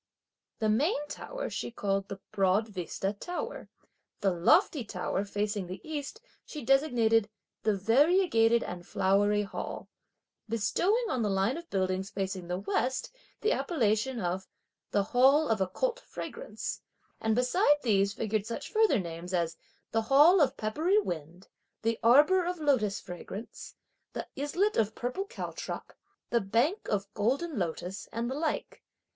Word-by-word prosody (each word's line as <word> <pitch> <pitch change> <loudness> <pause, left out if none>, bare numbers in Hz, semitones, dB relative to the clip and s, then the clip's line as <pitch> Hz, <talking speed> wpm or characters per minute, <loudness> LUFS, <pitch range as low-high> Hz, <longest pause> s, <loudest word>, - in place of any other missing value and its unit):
The 220 - 0
main 270 - +2
tower - - -5
she - - -3
called 195 -4 -1
the 195 - -7
Broad 195 +3 +2
Vista 195 0 -3
Tower. 350 - -5 0.5
The 195 -2 +3
lofty 270 - +3
tower 190 -1 -2
facing 205 -1 -2
the 185 - -6
east, 305 +7 -5 0.2
she 300 - -8
designated 235 -6 +3 0.3
"the 215 -1 +2
variegated 235 - +4
and 175 -1 -6
flowery 200 +3 +2
Hall;" 200 - -6 0.6
bestowing 355 - +1
on 255 - 0
the 210 - +1
line 195 +5 +1
of 340 +1 -8
buildings, 190 0 -1
facing 190 -3 -4
the 180 +1 -2
west, 210 - -1 0.3
the 430 - +2
appellation 235 - +1
of 185 0 -2 0.4
"the 200 - +2
Hall 270 +8 +4
of 220 -3 +1
Occult 475 - 0
Fragrance;" - - -6 0.4
and 220 0 +1
besides 290 - +3
these 200 -4 +3
figured 215 0 -1
such 230 - -5
further 435 - +4
names 175 0 -4
as: 170 -1 0 0.4
"the 225 - +2
Hall 295 - +6
of 285 - +2
peppery 310 - +1
wind," 175 - -3 0.4
"the 230 0 0
Arbour 295 +11 +6
of 355 +1 -2
lotus 255 -10 +2
fragrance," 190 +4 -8 0.4
"the - - -5
Islet 350 +10 0
of 220 -1 +1
purple 250 +11 -3
caltrop," - - -6 0.4
"the 235 - +3
Bank 240 - +1
of 200 -1 -2
golden 265 +6 0
lotus," 180 +2 -4
and 235 +2 -2
the - - -1
like. 305 +2 -3
225 Hz, 145 wpm, -30 LUFS, 195-295 Hz, 0.6 s, Hall